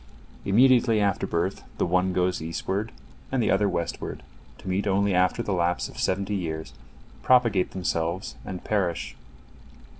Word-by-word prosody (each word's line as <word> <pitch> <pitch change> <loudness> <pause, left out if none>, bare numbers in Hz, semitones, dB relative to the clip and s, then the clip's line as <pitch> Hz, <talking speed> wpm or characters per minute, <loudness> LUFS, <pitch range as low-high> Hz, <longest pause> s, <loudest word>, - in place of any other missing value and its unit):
Immediately 120 +1 +5
after 100 -2 +1
birth, 85 +3 -1
the - - +1
one 90 +2 +2
goes 90 -1 0
eastward 95 +7 -3 0.4
and 135 - 0
the - - +2
other 100 +1 +3
westward, 85 -2 -4 0.3
to - - -13
meet 95 +2 0
only 100 0 +2
after 90 +6 +2
the 100 - -1
lapse 85 -1 0
of - - -11
seventy 100 +2 0
years, 80 -5 -4 0.5
propagate 115 -7 +3
themselves, 85 0 -2
and 90 -1 -6
perish. 95 -6 -1
95 Hz, 145 wpm, -26 LUFS, 90-105 Hz, 0.5 s, Immediately